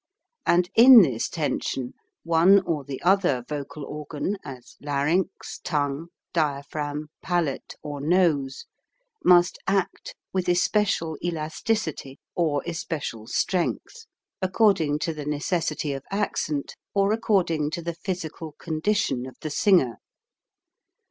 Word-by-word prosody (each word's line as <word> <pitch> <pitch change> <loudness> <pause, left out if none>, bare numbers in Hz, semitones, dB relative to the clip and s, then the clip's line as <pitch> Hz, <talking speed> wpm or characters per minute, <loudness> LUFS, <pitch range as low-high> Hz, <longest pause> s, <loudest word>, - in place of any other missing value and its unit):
And 175 +1 +4
in 240 -1 +10
this 125 -8 -1
tension 135 -5 -2 0.3
one 170 +4 +5
or 160 -6 -2
the 135 0 -6
other 175 -9 +3
vocal 145 0 -5
organ, 150 +5 -4
as 130 -3 -10
larynx, 150 +7 -1
tongue, 145 -1 -1 0.3
dia 145 -4 0
phragm, 150 0 -4
palate, 175 -6 -2
or 145 -1 -5
nose, 150 -5 +1 0.6
must 175 0 +5
act 195 -1 -1 0.2
with 185 -2 0
especial 175 -3 +1
elasticity 160 -2 -2 0.2
or 155 -5 0
especial 155 -9 -4
strength, 320 - -2 0.3
according 185 -6 +3
to 165 +1 -2
the 150 -1 -6
necessity 150 -1 -1
of 135 0 -6
accent 155 -7 -2 0.2
or 200 +1 +3
according 180 -9 +1
to 165 +2 -5
the 170 0 -4
physi 175 -2 -4
cal 160 -2 -7
condition 160 -6 -1
of 130 - -12
the 155 - -4
singer. 160 - +3
160 Hz, 120 wpm, -25 LUFS, 145-185 Hz, 0.6 s, in